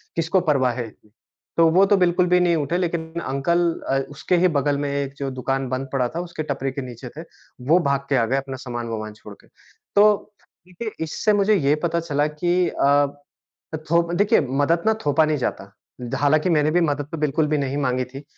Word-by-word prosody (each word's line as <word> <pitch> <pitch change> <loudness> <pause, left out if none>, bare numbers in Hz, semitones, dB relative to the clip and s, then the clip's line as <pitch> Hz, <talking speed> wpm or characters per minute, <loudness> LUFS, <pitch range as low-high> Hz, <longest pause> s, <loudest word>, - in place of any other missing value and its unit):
किसको 165 +3 +1
परवाह 130 -4 +2
है 120 -1 -4
इतनी? 105 -1 -20 0.5
तो 165 -1 +6
वो 185 +4 +5
तो 200 0 +3
बिल्कुल 180 0 +3
भी 180 0 +4
नहीं 175 -1 +3
उठे 155 +2 -1
लेकिन 170 -2 -3
अंकल 140 +6 0 0.3
अ, 135 - +2
उसके 145 +5 -1
ही - - +6
बगल 140 +1 0
में 145 0 -2
एक 140 -1 -3
जो 135 -1 -3
दुकान 135 +1 -2
बंद 130 +1 -3
पड़ा 130 -2 +1
था, - - -1
उसके 175 -3 -5
टपरी 135 0 -2
के 140 - -5
नीचे 125 -1 -8
थे, - - -5 0.5
वो 165 +4 +5
भाग 140 0 0
के 140 - +2
आ 115 - +2
गए 130 +4 0
अपना 135 -1 -4
सामान-वमानान 115 -3 -5
छोड़ 105 0 -12
के। - - -24 0.5
तो 210 0 +4 0.4
देखिए 200 +5 -6
इससे 185 +7 0
मुझे 205 +1 +3
ये 145 -6 +2
पता 170 0 +1
चला 145 -3 0
कि 175 +4 0
अ, 145 +1 +3 0.8
थोप 170 +1 +2
देखिए 205 +4 +3 0.2
मदद 165 +4 +1
ना 220 - +4
थोपा 145 +2 +3
नहीं 155 -1 0
जाता 100 -6 -4 0.3
द 120 -1 -4
हालाँकि 150 +4 +2
मैंने 155 -2 +2
भी 175 +2 +2
मदद 145 -3 -1
तो 165 - -4
बिल्कुल 150 +1 0
भी 150 0 +1
नहीं 140 -1 -2
माँगी 130 -2 0
थी। 135 +3 -10
145 Hz, 210 wpm, -22 LUFS, 135-170 Hz, 0.8 s, तो